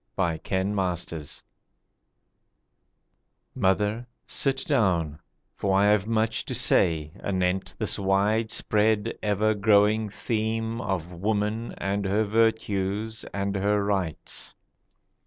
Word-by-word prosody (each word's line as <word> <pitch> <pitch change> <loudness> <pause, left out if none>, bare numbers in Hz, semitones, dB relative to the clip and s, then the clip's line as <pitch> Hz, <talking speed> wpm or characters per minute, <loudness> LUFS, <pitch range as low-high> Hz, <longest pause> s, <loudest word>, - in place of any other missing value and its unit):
A 85 -4 0
SON 95 -1 0
SPEAKS 80 -3 -6 2.1
MOTHER, 105 +5 +1 0.2
sit 135 -1 0
down, 90 - +1 0.4
for 95 -1 +1
I 100 - +4
have 105 -1 +2
much 110 0 +1
to - - -3
say 80 -3 +2
Anent 95 -1 -1
this 110 -1 -1
widespread 105 +1 +1
ever 105 +1 +2
growing 105 +1 +3
theme 115 +2 -2
Of 90 -6 -3
woman 105 +4 -1
and 100 +1 -2
her 100 +3 +2
virtues 110 -1 0
and 100 0 -3
her 100 +1 +1
rights. 95 -6 -2
100 Hz, 100 wpm, -26 LUFS, 95-110 Hz, 2.1 s, I